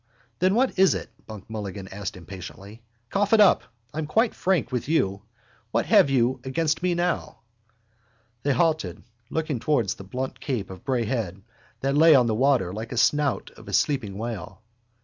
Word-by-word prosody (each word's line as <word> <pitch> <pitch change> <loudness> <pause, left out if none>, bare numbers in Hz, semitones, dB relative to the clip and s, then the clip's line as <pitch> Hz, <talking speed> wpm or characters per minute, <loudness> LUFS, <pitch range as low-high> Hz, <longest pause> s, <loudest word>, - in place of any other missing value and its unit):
—Then 185 +3 +3
what 255 -4 +1
is 190 -1 +5
it? - - -6 0.2
Buck 110 -3 -9
Mulligan 100 -3 -6
asked 100 -1 -6
impatiently. 95 +4 -10 0.3
Cough 205 +2 +1
it 225 - +6
up. 205 -3 +6 0.3
I'm 155 0 -3
quite 225 +9 +2
frank 175 -9 0
with 125 +2 -3
you. 100 -11 +1 0.5
What - - 0
have - - +5
you 130 -1 +1
against 155 +5 0
me 180 -1 +1
now? 175 0 -2 1.0
They 145 - +1
halted, 155 - 0 0.3
looking 155 -5 -2
towards 120 -7 +1
the - - -11
blunt 130 +7 -5
cape 125 -10 -3
of 95 +4 -10
Bray 130 -4 0
Head 105 -5 -3 0.4
that 135 +1 0
lay 160 +1 +7
on 125 -3 +5
the 115 - +1
water 120 -6 +2
like 110 +3 -5
the 125 - -5
snout 145 +3 +2
of - - -16
a - - -7
sleeping 110 -9 +1
whale. 115 0 -6
130 Hz, 175 wpm, -25 LUFS, 105-155 Hz, 1.0 s, lay